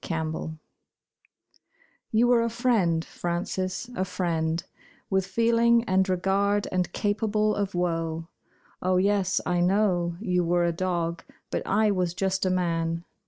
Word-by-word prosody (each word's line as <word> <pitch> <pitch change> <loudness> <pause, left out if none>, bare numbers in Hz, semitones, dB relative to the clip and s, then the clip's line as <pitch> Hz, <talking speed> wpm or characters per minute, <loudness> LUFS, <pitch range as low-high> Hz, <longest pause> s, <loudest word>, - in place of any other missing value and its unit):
FRANCES 160 -1 -3 1.6
You 225 +2 +4
were 240 -1 +4
a 230 - 0
friend, 220 -9 +1
Frances, 185 +4 -3
a 185 - 0
friend, 165 -3 -1 0.5
With 190 -1 +1
feeling 230 +3 +3
and 190 -3 +1
regard 195 +2 +1
and 180 -1 0
capable 215 0 0
of 200 -2 -2
woe. 165 -2 -1 0.5
Oh, 185 0 +2
yes, 195 0 +2
I 175 0 +1
know 175 -2 +1
you 180 -4 0
were 175 +1 +2
a 170 - +2
dog, 170 -1 -2 0.3
but - - -1
I 210 +1 +3
was 180 -3 -1
just 190 0 0
a - - +2
man. 165 -2 -1
185 Hz, 135 wpm, -26 LUFS, 170-205 Hz, 1.6 s, You